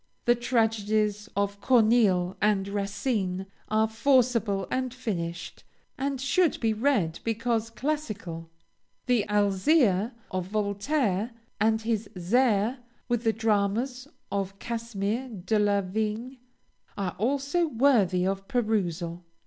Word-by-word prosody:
The 240 Hz, -, +6 dB
tragedies 220 Hz, -3 st, 0 dB
of 200 Hz, 0 st, -1 dB
Corneille 215 Hz, -7 st, +3 dB
and 200 Hz, -2 st, +2 dB
Racine 200 Hz, -1 st, -2 dB, 0.2 s
are 220 Hz, +1 st, +3 dB
forcible 230 Hz, -4 st, +2 dB
and 255 Hz, -1 st, -1 dB
finished, 175 Hz, -9 st, -5 dB, 0.3 s
and 275 Hz, 0 st, -2 dB
should 315 Hz, +5 st, +2 dB
be 225 Hz, -2 st, +1 dB
read 215 Hz, -, +1 dB
because 230 Hz, 0 st, -1 dB
classical. 220 Hz, -, -4 dB, 0.6 s
The 245 Hz, -5 st, +2 dB
"Alzire" 205 Hz, -, +3 dB, 0.2 s
of 185 Hz, -1 st, -2 dB
Voltaire 210 Hz, +1 st, 0 dB, 0.3 s
and 220 Hz, +1 st, +2 dB
his 220 Hz, -2 st, -1 dB
"Zaire" 225 Hz, +4 st, +2 dB, 0.3 s
with 240 Hz, -1 st, 0 dB
the 225 Hz, -, +3 dB
dramas 225 Hz, +4 st, 0 dB, 0.2 s
of 195 Hz, -1 st, -2 dB
Casimir 230 Hz, +1 st, -3 dB
de 210 Hz, 0 st, -1 dB
la 205 Hz, -1 st, +3 dB
Vigne 215 Hz, +6 st, -3 dB, 0.6 s
are 195 Hz, -3 st, -2 dB
also 280 Hz, -, +1 dB
worthy 225 Hz, -, +3 dB
of 195 Hz, 0 st, -2 dB
perusal. 180 Hz, -8 st, -1 dB
215 Hz, 110 wpm, -27 LUFS, 195-245 Hz, 0.6 s, The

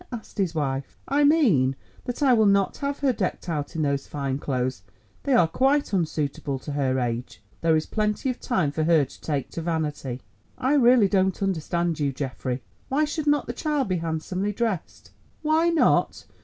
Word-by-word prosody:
asked 225 Hz, -3 st, -8 dB
his 180 Hz, -4 st, 0 dB
wife. 135 Hz, -3 st, -2 dB
"I 285 Hz, +2 st, +2 dB
mean 215 Hz, -, +4 dB, 0.3 s
that 245 Hz, +4 st, -3 dB
I 265 Hz, -3 st, +5 dB
will 220 Hz, -3 st, +4 dB
not 200 Hz, -1 st, +2 dB
have 280 Hz, 0 st, -2 dB
her 270 Hz, -3 st, +3 dB
decked 190 Hz, -3 st, -3 dB
out 150 Hz, -3 st, -3 dB
in 160 Hz, -, 0 dB
those 140 Hz, -1 st, -1 dB
fine 140 Hz, -2 st, -3 dB
clothes. 130 Hz, -6 st, -2 dB, 0.4 s
They 280 Hz, -, 0 dB
are 175 Hz, -9 st, +5 dB
quite 270 Hz, -, +1 dB
unsuitable 150 Hz, -5 st, -1 dB
to 150 Hz, -, -5 dB
her 135 Hz, -2 st, 0 dB
age. 120 Hz, -3 st, -3 dB, 0.2 s
There 165 Hz, -1 st, +3 dB
is 155 Hz, -, +1 dB
plenty 215 Hz, +4 st, -1 dB
of 250 Hz, -, -8 dB
time 185 Hz, -, 0 dB
for 155 Hz, +2 st, -1 dB
her 160 Hz, -3 st, +4 dB
to -, -, -16 dB
take 145 Hz, -4 st, -2 dB
to 165 Hz, -, -4 dB
vanity." 150 Hz, -6 st, -3 dB, 0.4 s
"I 260 Hz, +3 st, +1 dB
really 245 Hz, -6 st, +6 dB
don't 190 Hz, 0 st, +1 dB
understand 170 Hz, -2 st, -1 dB
you, 145 Hz, -2 st, +1 dB
Geoffrey. 130 Hz, -1 st, -4 dB, 0.3 s
Why 295 Hz, +3 st, +2 dB
should 300 Hz, 0 st, -4 dB
not 290 Hz, 0 st, +3 dB
the 240 Hz, -, -4 dB
child 290 Hz, -3 st, -1 dB
be 185 Hz, -, +1 dB
handsomely 170 Hz, +5 st, -2 dB
dressed?" 215 Hz, -5 st, -3 dB, 0.3 s
"Why 315 Hz, +2 st, +3 dB
not! 335 Hz, -2 st, +2 dB
175 Hz, 185 wpm, -25 LUFS, -, 0.4 s, really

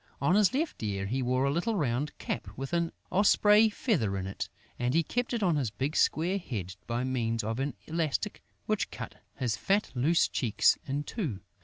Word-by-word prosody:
On 140 Hz, +6 st, +3 dB
his 205 Hz, -1 st, +5 dB
left 300 Hz, +5 st, -2 dB
ear, 100 Hz, -3 st, -2 dB
he 125 Hz, +7 st, -1 dB
wore 130 Hz, +1 st, +1 dB
a 140 Hz, -, +2 dB
little 175 Hz, +9 st, 0 dB
round 140 Hz, -3 st, -1 dB
cap 110 Hz, -, -4 dB
with 135 Hz, +4 st, -5 dB
an 170 Hz, -1 st, +1 dB, 0.2 s
osprey 210 Hz, +3 st, +5 dB
feather 150 Hz, -, 0 dB
in 95 Hz, -, -3 dB
it 95 Hz, -1 st, -4 dB, 0.3 s
and 125 Hz, +3 st, 0 dB
he 165 Hz, -, +4 dB
kept 245 Hz, +8 st, -2 dB
it 235 Hz, -4 st, -1 dB
on 170 Hz, -5 st, +3 dB
his 130 Hz, -6 st, 0 dB
big 130 Hz, +9 st, -3 dB
square 180 Hz, +5 st, +2 dB
head 95 Hz, -, -5 dB
by 120 Hz, +1 st, -1 dB
means 115 Hz, -3 st, -1 dB
of 110 Hz, +3 st, -2 dB
an 135 Hz, -1 st, -2 dB
elastic 160 Hz, -3 st, -1 dB, 0.2 s
which -, -, 0 dB
cut -, -, -8 dB
his 120 Hz, -4 st, -1 dB
fat, 195 Hz, -, +1 dB
loose 145 Hz, +7 st, +3 dB
cheeks 115 Hz, -6 st, +3 dB
in 140 Hz, +2 st, -1 dB
two. 145 Hz, -, -4 dB
140 Hz, 195 wpm, -30 LUFS, 115-180 Hz, 0.3 s, his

